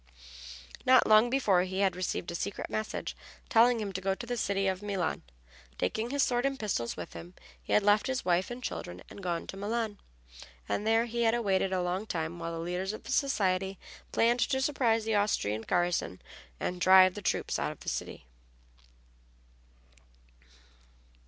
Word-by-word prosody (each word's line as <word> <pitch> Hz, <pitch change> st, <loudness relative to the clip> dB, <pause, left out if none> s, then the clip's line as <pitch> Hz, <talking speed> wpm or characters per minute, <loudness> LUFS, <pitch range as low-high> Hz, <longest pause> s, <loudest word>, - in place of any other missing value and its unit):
Not 255 Hz, -1 st, +6 dB
long 215 Hz, +2 st, +6 dB
before 215 Hz, -9 st, +3 dB
he 190 Hz, +1 st, -2 dB
had 190 Hz, -3 st, +2 dB
received 180 Hz, -1 st, -3 dB
a -, -, -6 dB
secret 195 Hz, +3 st, -4 dB
message 215 Hz, 0 st, -3 dB, 0.3 s
telling 240 Hz, -1 st, +5 dB
him 205 Hz, -2 st, -4 dB
to 185 Hz, -, -4 dB
go 195 Hz, 0 st, 0 dB
to 240 Hz, -, -7 dB
the 245 Hz, +1 st, -3 dB
city 200 Hz, -3 st, 0 dB
of 190 Hz, 0 st, 0 dB
Milan, 195 Hz, -5 st, -2 dB, 0.6 s
taking 220 Hz, -, -1 dB
his 280 Hz, +1 st, +2 dB
sword 245 Hz, -1 st, +1 dB
and 275 Hz, 0 st, -1 dB
pistols 180 Hz, -, -2 dB
with -, -, -7 dB
him. 175 Hz, +2 st, -10 dB, 0.3 s
He -, -, -4 dB
had 210 Hz, -, +4 dB
left 205 Hz, +1 st, +4 dB
his 260 Hz, 0 st, -2 dB
wife 180 Hz, +1 st, +2 dB
and 245 Hz, +1 st, -7 dB
children 90 Hz, -, -5 dB
and -, -, -10 dB
gone 175 Hz, -2 st, -2 dB
to 195 Hz, -, -8 dB
Milan, 215 Hz, +1 st, -2 dB, 0.7 s
and 210 Hz, -, -1 dB
there 225 Hz, +1 st, +3 dB
he 235 Hz, 0 st, -3 dB
had 230 Hz, 0 st, +3 dB
waited 195 Hz, -3 st, +1 dB
a 185 Hz, -1 st, 0 dB
long 185 Hz, +4 st, -2 dB
time 165 Hz, -1 st, -3 dB
while 165 Hz, 0 st, -4 dB
the -, -, -4 dB
leaders 180 Hz, +4 st, -3 dB
of 215 Hz, -, -8 dB
the -, -, -7 dB
society 195 Hz, -9 st, +1 dB, 0.3 s
planned 235 Hz, +2 st, +3 dB
to 265 Hz, +2 st, +1 dB
surprise 245 Hz, -5 st, +1 dB
the 220 Hz, -, 0 dB
Austrian 205 Hz, -, +1 dB
garrison 175 Hz, -, 0 dB, 0.4 s
and 180 Hz, 0 st, -3 dB
drive 185 Hz, 0 st, +7 dB
the 205 Hz, -, -7 dB
troops -, -, -1 dB
out -, -, -1 dB
of -, -, -13 dB
the -, -, -13 dB
city. -, -, -5 dB
200 Hz, 180 wpm, -30 LUFS, 180-230 Hz, 0.7 s, drive